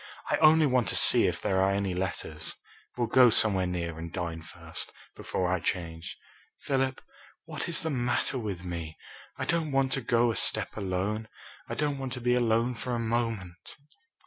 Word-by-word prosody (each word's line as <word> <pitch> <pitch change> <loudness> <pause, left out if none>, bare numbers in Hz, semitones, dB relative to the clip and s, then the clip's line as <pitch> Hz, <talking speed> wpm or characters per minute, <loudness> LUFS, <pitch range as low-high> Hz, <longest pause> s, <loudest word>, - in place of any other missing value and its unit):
I - - +3
only 155 0 +6
want 125 -4 +2
to - - -1
see - - +7
if - - -2
there 95 -1 +1
are 95 - +3
any 100 -1 0
letters. 80 -4 -4 0.4
We'll 120 - +1
go 125 +2 +6
somewhere 100 -4 +3
near 85 -2 -4
and 85 0 -6
dine 85 -2 -4
first, 80 - -8 0.2
before 90 -1 -2
I 95 - 0
change. 85 -1 -4 0.4
Philip, 135 -1 -1 0.4
what - - -5
is 170 - +2
the 160 - -1
matter 125 0 -1
with 100 -6 -5
me? 85 -3 -6 0.4
I - - -3
don't 165 -3 0
want 135 -1 +1
to 135 - 0
go 120 -2 +2
a - - -4
step 110 -2 +1
alone. 100 +2 -2 0.4
I - - -3
don't 145 -2 -1
want 135 -2 -4
to 125 - -5
be 125 0 +1
alone 120 0 +2
for 120 +1 -4
a - - -2
moment." 110 -6 -3
110 Hz, 185 wpm, -28 LUFS, 90-125 Hz, 0.4 s, see